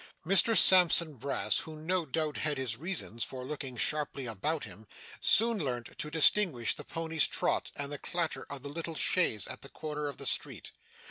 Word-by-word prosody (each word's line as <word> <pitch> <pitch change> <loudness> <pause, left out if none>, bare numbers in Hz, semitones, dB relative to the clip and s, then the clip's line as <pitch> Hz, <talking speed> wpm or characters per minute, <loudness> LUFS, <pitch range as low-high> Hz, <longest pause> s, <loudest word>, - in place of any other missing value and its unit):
Mr 195 +5 +5
Sampson 175 -3 +6
Brass, 140 +2 -1
who 160 - -8
no 165 +2 -2
doubt 155 +1 -3
had 150 -2 -2
his 130 -4 -2
reasons 140 - -3
for 130 -1 -6
looking 135 -3 -6
sharply 145 -2 0
about 130 +8 -3
him, 105 +1 -11 0.3
soon 230 0 +3
learnt 125 -6 -4
to 150 - -3
distinguish 160 - +3
the - - -8
pony's 160 -2 +1
trot - - -1
and 145 0 -4
the 145 - -5
clatter 170 -2 -3
of 140 -2 -8
the 140 - -5
little 165 +2 -5
chaise 150 - +2
at - - -5
the 140 - -9
corner 150 -1 -5
of 140 - -7
the - - -5
street. - - -1
150 Hz, 185 wpm, -30 LUFS, 130-165 Hz, 0.3 s, Sampson